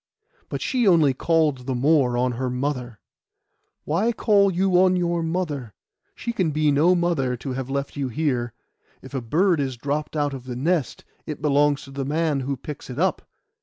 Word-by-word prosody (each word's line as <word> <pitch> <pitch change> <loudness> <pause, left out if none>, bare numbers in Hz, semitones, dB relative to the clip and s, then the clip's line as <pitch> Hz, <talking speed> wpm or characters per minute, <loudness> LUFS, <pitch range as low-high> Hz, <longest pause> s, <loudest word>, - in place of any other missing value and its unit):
But - - -4
she 250 -5 +1
only 160 -7 +5
called 150 -3 +1
the 130 - -1
more 130 -2 +3
on 125 +1 +1
her 125 +2 -2
mother. 125 -3 -3 0.9
'Why 190 +10 +1
call 205 -3 +3 0.3
on 185 0 +4
your 175 -1 0
mother? 160 - -3 0.4
She 235 - -4
can 185 -8 +1
be 150 0 +2
no 160 +6 +4
mother 160 -8 0
to 130 +2 -5
have 130 0 -4
left 140 +1 -3
you 140 -2 -2
here. 125 -3 -1 0.5
If 130 - -12
a 135 - -2
bird 165 - +2
is 135 -3 -2
dropped 145 +5 -3
out 145 -1 0
of 130 -2 -8
the 125 -1 -5
nest, 155 +3 -1 0.2
it 150 -2 -5
belongs 145 -1 +2
to 135 - -12
the 135 0 -4
man 150 +1 0
who 135 +1 -3
picks 145 +2 -8
it 125 - -7
up. 185 +4 +1
145 Hz, 185 wpm, -23 LUFS, 130-165 Hz, 0.9 s, only